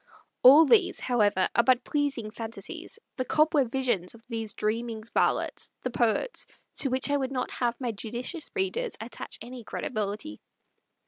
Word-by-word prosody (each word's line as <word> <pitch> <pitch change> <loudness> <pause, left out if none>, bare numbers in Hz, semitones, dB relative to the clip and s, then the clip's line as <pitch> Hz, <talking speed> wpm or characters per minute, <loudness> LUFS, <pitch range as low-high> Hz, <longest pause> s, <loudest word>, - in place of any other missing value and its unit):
All 285 +6 +9
these, 400 +3 +4
however, 210 -6 +2
are - - +5
but 255 +1 +4
pleasing 275 -7 -1
fantasies, 225 - -6 0.2
the 255 - 0
cobweb 305 -3 +3
visions 240 -9 0
of 230 - -17
those 225 -3 -3
dreaming 220 +1 -2
varlets, - - +1
the 255 - -2
poets, 240 - 0 0.3
to 275 - +2
which 260 +2 +1
I 285 - +3
would 265 -1 -2
not 255 -2 -2
have 240 -1 -1
my 245 -3 -1
judicious 240 - -4
readers 425 +4 -1
attach 225 +2 -7
any 245 0 -9
credibility. 215 +6 -4
245 Hz, 150 wpm, -28 LUFS, 225-285 Hz, 0.3 s, All